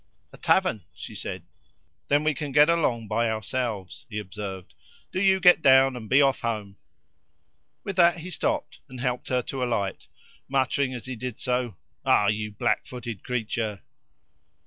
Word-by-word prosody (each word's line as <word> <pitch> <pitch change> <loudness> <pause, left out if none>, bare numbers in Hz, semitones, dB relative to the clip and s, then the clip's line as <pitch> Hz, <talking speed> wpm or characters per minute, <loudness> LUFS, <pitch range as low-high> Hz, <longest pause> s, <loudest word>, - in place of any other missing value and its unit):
"A - - -12
tavern," 185 - +2
she - - -8
said. - - -5 0.6
"Then 145 +1 +3
we 155 0 +2
can 145 +1 -5
get 150 +3 +6
along 120 -9 0
by 115 +2 +1
ourselves," 110 -3 -3
he 105 - -5
observed. 95 -2 -6 0.4
"Do 185 - -1
you 190 -1 +4
get 180 -2 +6
down, 130 -1 +6
and 110 -4 -8
be 140 +2 +6
off 135 -1 +2
home." 105 -4 -3 1.1
With 195 -2 -5
that 175 -1 +5
he 175 +2 -7
stopped, 295 - -2
and 130 -1 -9
helped 125 0 -2
her 125 -1 0
to 130 +1 -3
alight 110 -6 -2 0.4
muttering 135 0 +1
as 120 - -7
he 130 -1 -5
did 125 -1 -5
so: 125 -4 -1 0.3
"Ah, 100 - +4
you 105 0 -2
blackfooted 115 +1 -2
creature!" 110 -4 -3
125 Hz, 160 wpm, -26 LUFS, 110-140 Hz, 1.1 s, get